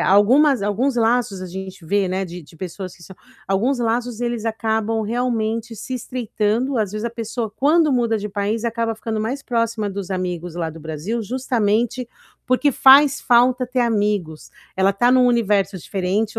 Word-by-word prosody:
algumas 245 +5 +4
alguns 240 +6 0
laços 225 -4 +1
a 185 - -5
gente 190 -1 -8
vê, 200 +3 +1
né, 190 +1 -1
de 175 0 -9
de 160 - -18
pessoas 185 +1 -7
que 170 - -18
são 190 +2 -13 0.3
alguns 240 +7 +1
laços 235 0 -1
eles 235 -2 -2
acabam 220 0 -1
realmente 230 0 -2
se 255 +5 -6
estreitando. 240 +1 -1
Às 205 -2 -1
vezes, 215 +1 -4
a - - -3
pessoa, 230 -1 -4
quando 295 +7 +3
muda 235 -3 +1
de 210 0 -5
país, 205 +3 -2
acaba 230 -1 -1
ficando 220 0 -4
mais 260 +6 -3
próxima 230 -4 -1
dos 195 -2 -5
amigos 180 -2 -3
lá 170 -2 -2
do 165 - -11
Brasil, 160 +9 -4
justamente 240 0 0 0.4
porque 255 +3 +3
faz 275 +2 +6
falta 250 +1 +3
ter 250 0 -1
amigos. 205 -8 -1 0.3
Ela 190 +1 +3
tá 240 +5 +2
em 260 - +5
um 250 - +5
universo 205 -5 +1
diferente, 200 +5 -2
220 Hz, 175 wpm, -21 LUFS, 195-245 Hz, 0.4 s, faz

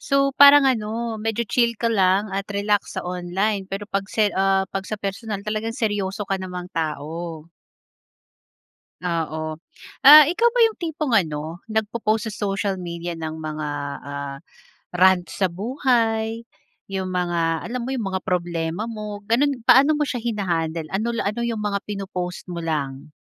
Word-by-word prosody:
So, 275 0 +2
parang 285 +1 +8
ano, 230 -2 -1
medyo 225 +1 -1
chill 235 +1 +1
ka 230 - -1
lang 195 0 +2
at 195 +1 -3
relax 205 0 -1
sa - - -3
online 190 +3 -2
pero 195 +1 -4
'pag 195 -1 -3
se 210 -2 +1
ah, 195 0 +2
'pag 195 -1 -3
sa 215 - -3
personal 200 0 -5
talagang 215 +1 -3
seryoso 205 -2 -1
ka 195 -1 -2
namang 180 -1 -6
tao. 160 +1 -4 1.6
Oo. 160 -3 -2 0.5
Ah, 300 +1 +11
ikaw 430 +8 +3
ba - - +1
yung 450 -1 +4
tipong 305 -7 -1
ano, 160 -2 -2
nagpo-post 220 0 0
sa - - -6
social 195 0 -1
media 170 -1 -5
ng 160 -1 -4
mga, 155 -1 -4 0.4
ah, 140 -1 -5 0.6
rants 185 0 +3
sa 190 -4 +1
buhay, 225 +1 0 0.5
'yong 190 -1 -3
mga, 170 -2 0
alam 250 +2 -3
mo - - -5
'yong 235 -6 -2
mga 190 - -1
problema 175 +1 -2
mo, 210 -2 -6
gano'n. 255 +1 +1
Paano 280 +4 +7
mo 295 - +1
siya 245 - -2
hina-handle? 170 -8 -2
Ano 220 +5 -1
la 230 -3 -1
ano 215 +4 -3
yung 230 -2 -2
mga 205 -1 -1
pino-post 190 -3 -5
mo 175 -1 -4
lang? 145 -2 -3
200 Hz, 155 wpm, -23 LUFS, 175-225 Hz, 1.6 s, Ah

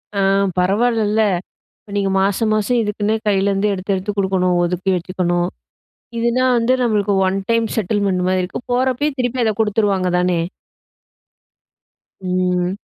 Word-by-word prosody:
அ, - - 0 0.4
பரவாயிலல்ல, 215 +3 +2 0.6
இப்ப 205 - -15
நீங்க 195 -1 0
மாசம், 200 +3 +1
மாசம் 215 +3 +1
இதுக்குன்னே 210 0 -1
கையிலேருந்து 200 0 +1
எடுத்து, 195 +1 -2
எடுத்து 195 +2 -3
குடுக்கணும் 185 -2 +1
ஒதுக்கி 180 +2 -1
வச்சுக்கணும். 175 0 -1 0.7
இதுனா 235 +2 +1
வந்து 235 +2 +2
நம்மளுக்கு 210 -3 +1
ஒன் 190 +1 0
டைம் 230 -1 +2
செட்டில்மெண்ட் 200 -3 0
மாதிரி 185 0 +1
இருக்கும். 180 - -6
போறப்பயே 260 +4 +1
திருப்பி 245 0 0
அதை 220 - +1
குடுத்துருவாங்க 205 -3 +1
தானே! 180 -1 +1 1.8
ம். 180 0 0
200 Hz, 125 wpm, -19 LUFS, 185-225 Hz, 1.8 s, பரவாயிலல்ல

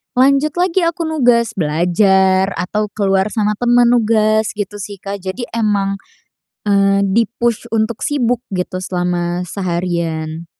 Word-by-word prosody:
lanjut 275 +3 +3
lagi 360 +1 +1
aku 335 0 -2
nugas 245 -8 +2
belajar 190 +3 +2
atau 210 +4 -2
keluar 195 -2 +1
sama 210 -1 -1
temen 240 0 +4
nugas, 220 -2 +2
gitu 205 0 -5
sih, 200 +1 -6
Kak. 200 0 -5
Jadi 190 +6 -5
emang, 200 -3 0 0.7
eee, 195 0 +3
di-push 230 +2 0
untuk 220 0 -1
sibuk 245 -4 0
gitu 185 0 -3
selama 180 -1 -2
seharian. 170 -3 -3
205 Hz, 125 wpm, -17 LUFS, 185-235 Hz, 0.7 s, temen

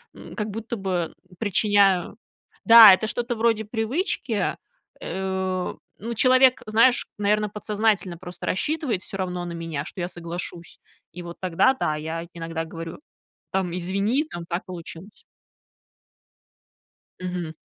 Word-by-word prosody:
м, - - -11
как 215 -1 -3
будто 225 +3 -5
бы 185 -5 -2 0.3
причиняю 200 -3 +2 0.5
Да, 225 -3 +11
это 220 +4 +1
что-то 240 +2 -2
вроде 225 -1 +2
привычки. 230 - -1 0.4
Э, 190 -1 -2 0.2
ну, 230 +4 -4
человек, 255 +2 +5
знаешь, 230 +4 +3
наверно, 210 +1 +1
подсознательно 210 -3 0
просто 175 0 -9
рассчитывает 260 - -1
всё - - -9
равно 180 -2 -3
на 170 - -5
меня, 165 -3 -4
что 180 - -7
я 175 - -1
соглашусь. 170 0 -7 0.4
И 180 - -7
вот 170 0 -9
тогда, 185 +8 +3
да, 155 - 0
я 160 +2 -5
иногда 165 -1 -4
говорю: 165 0 -8 0.5
"Там, 185 -2 -1
извини, 200 +9 0
там 175 - -6
так 170 +3 -3
получилось". 180 +2 -10 2.0
Мгм. 180 -3 -4
190 Hz, 130 wpm, -24 LUFS, 175-220 Hz, 2.0 s, Да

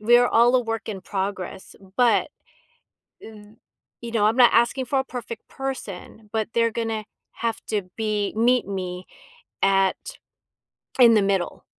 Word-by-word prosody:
we 235 +3 +5
are 245 - +3
all 240 +2 +4
a - - +3
work 225 -1 -4
in 200 -3 -5
progress, 190 -1 -5 0.2
but 230 -7 +3 0.9
th 215 0 -13 0.4
you 235 -1 -7
know, 215 -3 +2
I'm 225 - +1
not 245 -2 +6
asking 240 +3 +2
for 270 +2 0
a - - 0
perfect 235 -3 -8
person, 220 -5 -7
but 220 -1 -2
they're 230 -1 +2
gonna 225 -2 -3 0.3
have 230 -1 -3
to 210 -3 -1
be 210 -2 -1
meet 245 0 +2
me 185 -2 -5 0.6
at 195 -1 +3 1.0
in 235 -2 +8
the 215 - +4
middle, 195 -3 -1
220 Hz, 155 wpm, -23 LUFS, 200-235 Hz, 1.0 s, in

